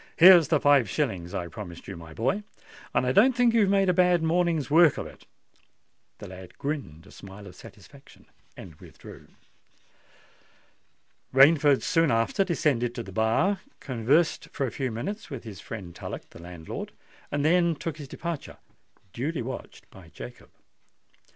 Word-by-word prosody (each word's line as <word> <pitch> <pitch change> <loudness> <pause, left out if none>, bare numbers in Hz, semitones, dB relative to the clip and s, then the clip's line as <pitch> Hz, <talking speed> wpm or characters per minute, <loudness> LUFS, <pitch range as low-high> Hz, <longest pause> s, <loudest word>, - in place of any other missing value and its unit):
"Here's 175 -2 +8
the 155 - +2
five 140 -7 +4
shillings 90 -2 -2
I 85 - -3
promised 90 -4 -10
you, 95 - -6
my 80 -1 -11
boy; 130 - -1 0.5
and - - +1
I 125 - +1
don't 255 - +5
think 240 -1 +3
you've 215 -4 +3
made 195 -1 +3
a 180 - +3
bad 180 -2 +3
morning's 165 -3 +1
work 165 -1 +5
of - - -4
it." - - -14 0.9
The - - -10
lad 95 -1 -12
grinned 135 - -5
a - - -16
smile 100 +1 -12
of - - -12
satisfaction, - - -16 0.3
and 90 - -10
withdrew. - - -14 2.0
Rainford 145 +1 +5
soon 165 -3 +2
after 115 - +1
descended 140 -9 0
to 120 - -4
the 95 - -10
bar, 115 - +1 0.2
conversed 135 +6 0
for 140 - -2
a 125 - -4
few 130 -2 -3
minutes 195 - -5
with 135 -5 -7
his 105 -6 -9
friend 95 -6 -8
Tullock, - - -8
the - - -13
landlord, 85 -2 -8 0.4
and 145 0 -1
then 170 0 +3
took 160 +1 -5
his 145 -3 -9
departure—duly 145 - -7
watched 130 +3 -8
by - - -15
Jacob. 60 0 -11
135 Hz, 155 wpm, -26 LUFS, 105-170 Hz, 2.0 s, Here's